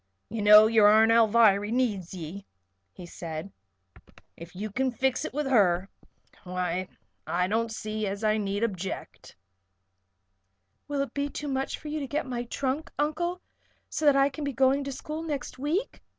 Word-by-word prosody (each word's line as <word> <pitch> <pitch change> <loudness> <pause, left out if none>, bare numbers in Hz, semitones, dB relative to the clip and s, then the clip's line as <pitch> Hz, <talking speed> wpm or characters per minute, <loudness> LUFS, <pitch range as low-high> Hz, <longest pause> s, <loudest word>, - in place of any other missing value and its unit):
"You 225 0 -4
know 210 +1 +9
your 220 -2 +5
Aunt 220 +2 +6
Alviry 220 -2 +4
needs 215 -8 -1
ye," 180 +2 -8 0.4
he 175 - -11
said. 165 +1 -7 0.8
"If 170 +2 -12
you 210 +3 -5
kin 260 +5 0
fix 255 +1 -1
it - - -4
with 295 +2 -2
her, 195 -7 +3 0.5
why 180 0 -2 0.4
I 180 +1 0
don't 225 +3 0
see 215 -1 -3
as 200 +2 -4
I 215 0 +2
need 200 0 -2
object." 190 -4 -5 1.5
"Will 285 -1 -1
it 275 - -4
be 285 0 -2
too 295 - -6
much 270 -1 -2
trouble - - -16
for 310 - -9
you 305 +1 -3
to 280 - -4
get 295 +4 -2
my 245 -2 -4
trunk, 270 +5 -3
Uncle, 345 +5 -1 0.5
so 310 - -2
that 285 - +6
I 275 0 +4
can 285 +2 -7
begin 280 -2 -3
going 270 +2 +3
to 275 - -4
school 305 +4 -6
next 290 -6 -5
week?" 325 - -2
230 Hz, 175 wpm, -27 LUFS, 200-275 Hz, 1.5 s, know